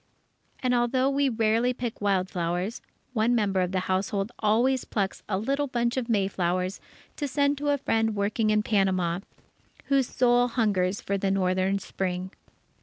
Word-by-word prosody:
And 250 -1 +2
although 255 +2 +2
we 280 0 +2
rarely 230 +1 +2
pick 240 -4 -5
wild 195 -2 +1
flowers, 180 +4 -2 0.3
one 235 +1 +2
member 200 -4 +1
of 180 0 -1
the 185 -1 0
household 195 +3 -1
always 235 +5 +2
plucks 195 -3 -2
a 190 - +1
little 275 +7 -1
bunch 240 -1 0
of 250 -2 -2
mayflowers 185 -3 0 0.4
to 290 - -2
send 280 +1 +1
to 290 0 -1
a 285 - +3
friend 225 -5 0
working 215 +2 0
in 215 0 +2
Panama, 185 -5 +1 0.7
whose 275 -3 +3
soul 245 -1 +3
hungers 205 -6 0
for 200 0 -2
the 195 - 0
northern 190 0 +1
Spring. 185 -1 -4
215 Hz, 160 wpm, -27 LUFS, 190-245 Hz, 0.7 s, a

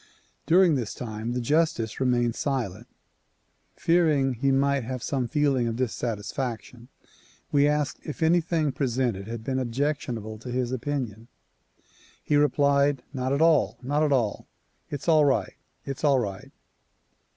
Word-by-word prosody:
During 175 0 +5
this 120 -6 -2
time 110 0 -5
the 125 - -1
justice 125 -4 0
remained 120 -2 +2
silent. 120 -6 -3 0.9
Fearing 155 -6 +2
he 135 +3 0
might 140 0 +2
have 125 +1 -5
some 130 -3 -1
feeling 140 -4 +1
of 115 - -2
dissatisfaction 120 0 -4 0.6
we 145 0 +4
asked 150 -1 0
if 150 +1 -5
anything 165 -2 +2
presented 125 -7 -1
had 115 -1 -6
been 130 +2 -1
objectionable 120 -4 -2
to 125 - -9
his 125 0 -1
opinion. 125 -4 -4 1.0
He 150 - +1
replied 140 -1 +3
"Not 130 -1 -2
at 140 +3 +2
all! 130 -10 +3
Not 145 +4 0
at 150 -2 +2
all! 120 -7 0 0.4
It's 145 +2 -6
all 155 -2 +5
right! 140 -2 +1 0.3
It's 135 +1 -6
all 140 -3 +4
right!" 100 -6 -4
130 Hz, 140 wpm, -26 LUFS, 120-145 Hz, 1.0 s, During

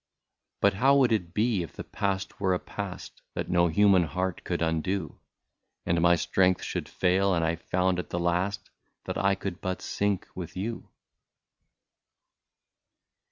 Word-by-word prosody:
" - - -57
But 100 0 +5
how 135 +8 +4
would 130 -4 +4
it 90 -6 0
be, 105 0 +1
if 85 - -7
the - - -7
past 100 -1 -3
were 95 -2 +2
a - - -2
past, 100 -3 -7
That - - -3
no 85 -1 +4
human 95 +2 +5
love 90 -1 -2
could - - -1
undo. 80 +1 -1 0.7
And 85 0 +1
my 85 0 +6
strength 90 +2 +2
should - - -4
fail, 95 +1 +2
and 85 -1 +1
I 85 +1 +1
found 90 +2 0
at 90 - -5
the - - -3
last 90 +3 -1 0.3
That - - -3
I 100 0 +3
could 95 -2 -5
but 95 0 -2
sink 100 -2 -1
with 90 -1 -7
you 115 +5 -4
95 Hz, 160 wpm, -28 LUFS, 85-100 Hz, 0.7 s, my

